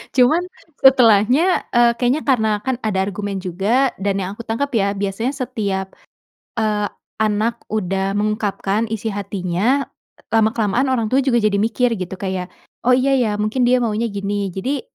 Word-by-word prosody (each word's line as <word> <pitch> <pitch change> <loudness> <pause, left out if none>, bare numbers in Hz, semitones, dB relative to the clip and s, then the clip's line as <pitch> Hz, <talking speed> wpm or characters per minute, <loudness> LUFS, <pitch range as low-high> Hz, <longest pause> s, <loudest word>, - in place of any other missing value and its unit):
Cuman 260 +7 +4 0.4
setelahnya, 255 - +5
eee, 240 -1 +5
kayaknya 250 +5 +1
karena 230 -5 +3 0.2
kan 260 -1 0
ada 210 -3 0
argumen 200 0 -3
juga 200 +9 +1
dan 195 0 -1
yang 185 - -3
aku 230 - -8
tangkap 255 +6 -2
ya 200 -2 +2
biasanya 200 +6 -2
setiap, 210 -8 -3 0.6
eee, 210 -2 +1 0.3
anak 220 +2 0
udah 195 -2 -1
mengungkapkan 210 0 -1
isi 225 0 -3
hatinya 200 +6 -1 0.5
lama-kelamaan 220 +2 +2
orang 230 -4 +1
tua 270 +2 +3
juga 255 -3 +2
jadi 210 -1 +2
mikir 235 +2 +1
gitu 185 -3 -5
kayak, 190 -2 -4 0.4
"Oh - - +5
iya 265 +2 +2
ya, 240 -5 +1
mungkin 215 +5 0
dia 255 - +4
maunya 225 0 0
gini." 200 0 -2
Jadi 250 +11 -2
215 Hz, 155 wpm, -19 LUFS, 200-250 Hz, 0.6 s, setelahnya